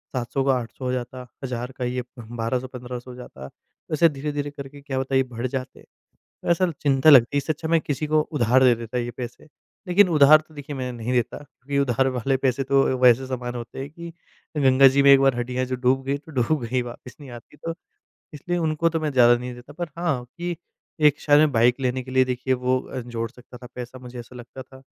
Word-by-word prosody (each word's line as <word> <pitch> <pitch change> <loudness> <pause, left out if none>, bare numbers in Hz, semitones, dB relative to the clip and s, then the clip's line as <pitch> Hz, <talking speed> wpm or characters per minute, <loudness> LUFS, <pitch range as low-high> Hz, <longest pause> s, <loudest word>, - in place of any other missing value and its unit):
700 130 +2 -1
का 135 - +4
800 120 +2 -8
हो 125 - 0
जाता, 125 0 -5 0.2
1000 125 -1 -4
का 125 - -4
ये 125 0 -2 0.2
1200-1500 120 +2 -5
हो - - -10
जाता। 70 - -10 0.4
ऐसे 165 +2 +5
धीरे-धीरे 145 0 -4
करके, 140 0 -10
क्या 135 -2 -3
पता, 135 0 -2
ये 130 - +4
बढ़ 125 -1 -5
जाते। 130 +1 -6 0.7
ऐसा 175 +1 +2
चिंता 140 +1 +4
लगती 135 -2 +7
है, - - +4
इससे 145 +3 0
अच्छा 160 +2 -6
मैं 165 0 +3
किसी 150 +1 -3
को 155 0 +3
उधार 130 -2 +3
दे 125 -2 +6
देता 115 +1 -6
ये 120 0 -2
पैसे। 120 +2 -8 0.4
लेकिन 185 +2 +5
उधार 155 -1 +7
तो 160 - -20
देखिए, 145 0 -7
मैं 130 -1 -4
नहीं 120 +1 -4
देता 120 -2 0
क्योंकि 140 -1 -7
उधार 135 -1 +1
वाले 135 +3 0
पैसे 130 0 0
तो 135 +1 +3 0.2
वैसे 125 +1 +5
समान 125 -1 -4
होते 120 0 -7
हैं 135 +1 -5
कि 170 +2 -9 0.5
गंगा 135 -1 +6
जी 135 +1 +3
में 140 - +7
एक 135 - +8
बार 135 -2 +3
हड्डियाँ 125 +1 -2
जो 130 0 -3
डूब 130 +1 +1
गई, 140 +1 -1
तो 155 +3 -15
डूब 135 +1 0
गई 125 +2 0
वापस 120 +1 -10
नहीं 145 -3 -11
आती 120 +4 -13
तो। 165 +3 -5 0.6
इसलिए 175 +4 -3
उनको 160 0 +1
तो 165 -1 -2
मैं 155 -1 -1
ज़्यादा 120 -2 +6
नहीं 125 0 -6
देता, 125 +4 -13
पर 170 +2 -5
हाँ, 150 -8 -1
कि 175 +7 -6 0.4
एक 150 -1 +4
शायद 145 -1 +4
मैं 155 0 +4
बाइक 120 +2 +3
लेने 130 0 -1
के 130 - -11
लिए, 130 0 +4
देखिए, 130 +1 -1
वो 125 0 0
अ, 130 - -7
जोड़ 115 -2 -5
सकता 125 0 -15
था 125 - -11
पैसा, 125 +1 -8
मुझे 125 -1 -10
ऐसा 120 +1 -13
लगता 120 +2 -10
था, 130 +1 -17
130 Hz, 225 wpm, -23 LUFS, 125-145 Hz, 0.7 s, एक